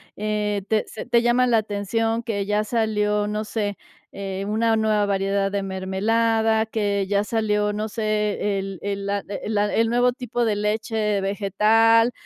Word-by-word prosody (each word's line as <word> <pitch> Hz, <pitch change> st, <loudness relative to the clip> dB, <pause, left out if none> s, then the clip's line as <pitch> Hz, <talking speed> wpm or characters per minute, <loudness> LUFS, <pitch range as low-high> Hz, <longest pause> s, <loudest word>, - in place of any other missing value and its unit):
eh, 210 Hz, -1 st, -1 dB
te 215 Hz, 0 st, +1 dB
se -, -, -8 dB
te 235 Hz, -, +3 dB
llama 240 Hz, +1 st, +3 dB
la 240 Hz, -2 st, +3 dB
atención 225 Hz, +2 st, -1 dB
que 205 Hz, -4 st, -2 dB
ya 210 Hz, +1 st, +1 dB
salió, 210 Hz, -2 st, 0 dB
no 210 Hz, +1 st, -2 dB
sé, 210 Hz, -2 st, -3 dB, 0.4 s
eh, 195 Hz, 0 st, -4 dB
una 225 Hz, +2 st, +2 dB
nueva 215 Hz, -1 st, +2 dB
variedad 195 Hz, 0 st, 0 dB
de 200 Hz, 0 st, -1 dB
mermelada, 220 Hz, +4 st, +1 dB
que 205 Hz, -3 st, -1 dB
ya 200 Hz, +1 st, +1 dB
salió, 210 Hz, -1 st, 0 dB
no 210 Hz, +1 st, -3 dB
sé, 210 Hz, -2 st, -1 dB
el 195 Hz, -2 st, -6 dB
el 200 Hz, 0 st, -3 dB
la 200 Hz, 0 st, 0 dB
e 200 Hz, -, -5 dB
el 220 Hz, -, -3 dB
la 205 Hz, 0 st, +1 dB
el 225 Hz, 0 st, +2 dB
nuevo 245 Hz, +1 st, +3 dB
tipo 245 Hz, -1 st, -3 dB
de 220 Hz, -3 st, +1 dB
leche 210 Hz, 0 st, -1 dB
vegetal 220 Hz, +4 st, +3 dB
210 Hz, 170 wpm, -23 LUFS, 200-225 Hz, 0.4 s, te